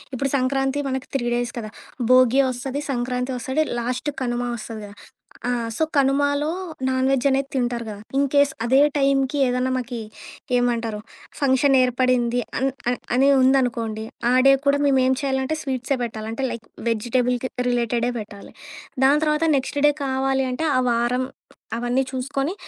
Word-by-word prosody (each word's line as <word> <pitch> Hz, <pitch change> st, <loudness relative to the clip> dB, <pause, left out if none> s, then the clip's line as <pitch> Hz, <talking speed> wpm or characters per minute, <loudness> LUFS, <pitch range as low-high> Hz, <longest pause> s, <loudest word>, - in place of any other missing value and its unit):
ఇప్పుడు 275 Hz, +1 st, -1 dB
సంక్రాంతి 270 Hz, +2 st, 0 dB
మనకి 265 Hz, 0 st, -4 dB
3 240 Hz, -3 st, 0 dB
డేస్ 240 Hz, 0 st, -2 dB
కదా, 215 Hz, -2 st, -7 dB, 0.4 s
భోగి 255 Hz, +1 st, +6 dB
ఒస్తది, 265 Hz, +3 st, -4 dB
సంక్రాంతి 250 Hz, +1 st, -2 dB
ఒస్తది, 265 Hz, +6 st, 0 dB, 0.2 s
లాస్ట్‌కు 250 Hz, +4 st, -3 dB
కనుమ 240 Hz, 0 st, -1 dB
ఒస్తది 220 Hz, -1 st, -7 dB
గదా! 205 Hz, -, -13 dB, 0.5 s
ఆ! -, -, 0 dB, 0.3 s
సో, 320 Hz, -, +1 dB
కనుమాలో 285 Hz, +1 st, +2 dB, 0.4 s
నాన్‌వెజ్ 260 Hz, 0 st, +1 dB
అనేది 270 Hz, 0 st, 0 dB
తింటారు 240 Hz, -2 st, -1 dB
గదా. 205 Hz, -1 st, -7 dB, 0.2 s
ఇన్‌కేస్ 280 Hz, 0 st, +3 dB
అదే 260 Hz, +3 st, +4 dB, 0.2 s
టైమ్‌కి 275 Hz, 0 st, +2 dB
ఏదన్నా 250 Hz, +1 st, 0 dB
మాకి 245 Hz, -2 st, -4 dB, 0.6 s
ఏమంటారు? 235 Hz, -3 st, 0 dB, 0.4 s
ఫంక్షన్ 270 Hz, 0 st, +3 dB
ఏర్పడింది 250 Hz, -1 st, +1 dB, 0.2 s
అన్ 265 Hz, +2 st, +1 dB, 0.2 s
అ -, -, +2 dB, 0.2 s
అనే 265 Hz, +2 st, +4 dB
ఉందనుకోండి, 240 Hz, -4 st, +1 dB, 0.3 s
ఆ -, -, +3 dB
డే 275 Hz, -, +8 dB
ఇతర-భాష 270 Hz, -, -9 dB
కూడా 280 Hz, 0 st, +3 dB
మేమేం 260 Hz, -2 st, +3 dB
చేయాలంటే, 265 Hz, +2 st, -1 dB
స్వీట్సే 260 Hz, 0 st, -2 dB, 0.4 s
అంటే 265 Hz, +4 st, -4 dB
లైక్ 235 Hz, -1 st, -7 dB, 0.2 s
వెజిటేబుల్‌కి 245 Hz, +3 st, 0 dB, 0.2 s
రిలేటెడే 240 Hz, 0 st, 0 dB
పెట్టాలి. 205 Hz, -1 st, -10 dB, 0.5 s
దాని 285 Hz, +3 st, +5 dB
తర్వాత 300 Hz, +1 st, +1 dB
నెక్స్ట్ 275 Hz, +2 st, -1 dB
డే -, -, +5 dB
కావాలి 265 Hz, 0 st, 0 dB
అంటే, 285 Hz, +6 st, -2 dB
ఆ -, -, +4 dB
వారం 240 Hz, +2 st, +1 dB, 0.5 s
అవన్నీ 245 Hz, +3 st, 0 dB
చూసుకొని 275 Hz, +4 st, -2 dB
260 Hz, 145 wpm, -22 LUFS, 240-275 Hz, 0.6 s, డే